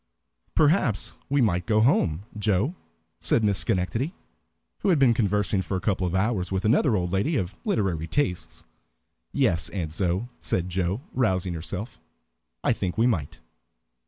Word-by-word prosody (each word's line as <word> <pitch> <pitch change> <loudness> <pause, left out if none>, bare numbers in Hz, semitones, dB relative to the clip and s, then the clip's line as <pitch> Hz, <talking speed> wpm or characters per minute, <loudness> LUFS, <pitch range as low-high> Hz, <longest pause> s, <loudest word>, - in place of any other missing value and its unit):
"Perhaps 150 - +2
we 140 0 +3
might 90 -6 +1
go 110 -2 +3
home, 95 - +2
Joe," 105 - +1 0.5
said 115 - +2
Miss 100 -2 +2
Schenectady, 115 - -1 0.6
who - - 0
had 175 - +4
been 135 -4 +5
conversing 105 -3 +1
for 95 +1 -2
a - - -2
couple 95 -2 0
of 90 - -2
hours 95 -2 0
with 95 +2 -1
another 120 +1 +3
old 90 -3 -1
lady 100 - +1
of 95 -6 -2
literary 90 -7 0
tastes. 90 - -2 0.7
"Yes, 85 +1 +1
Aunt 85 -6 -4
Zoë," 90 +6 -1
said 90 0 -1
Joe, 90 +5 -1
rousing 95 -8 +1
herself, 95 +7 -6 0.6
"I - - +3
think 90 +1 -3
we 115 - +4
might." 85 - -1
100 Hz, 155 wpm, -26 LUFS, 90-115 Hz, 0.7 s, been